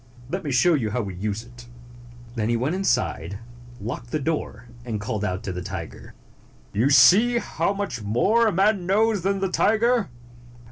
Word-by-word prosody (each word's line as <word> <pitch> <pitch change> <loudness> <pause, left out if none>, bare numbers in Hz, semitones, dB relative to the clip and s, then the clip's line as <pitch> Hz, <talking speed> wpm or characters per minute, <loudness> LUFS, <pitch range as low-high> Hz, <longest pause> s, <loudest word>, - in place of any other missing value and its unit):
Let 185 - -3
me 150 - -4
show 165 +8 +4
you 125 -8 0
how 120 +2 -2
we 100 -2 -6
use 105 +4 -4
it." 120 0 -15 0.7
Then 115 -2 -2
he 120 - +2
went 130 +7 -1
inside, 100 - -1 0.4
locked 120 +3 -6
the 155 - -1
door, 140 -6 -3 0.2
and 115 -3 -4
called 105 0 -3
out 95 -2 -2
to 95 - -4
the 90 0 -5
tiger, 90 -3 -8 0.6
"You 120 +6 +2
see 220 - +6
how 235 - -1
much 200 - -4
more 205 - +2
man 195 0 +1
knows 210 +1 +2
than 195 +2 -1
the 195 - 0
tiger. 225 +2 +2
130 Hz, 175 wpm, -24 LUFS, -, 0.7 s, see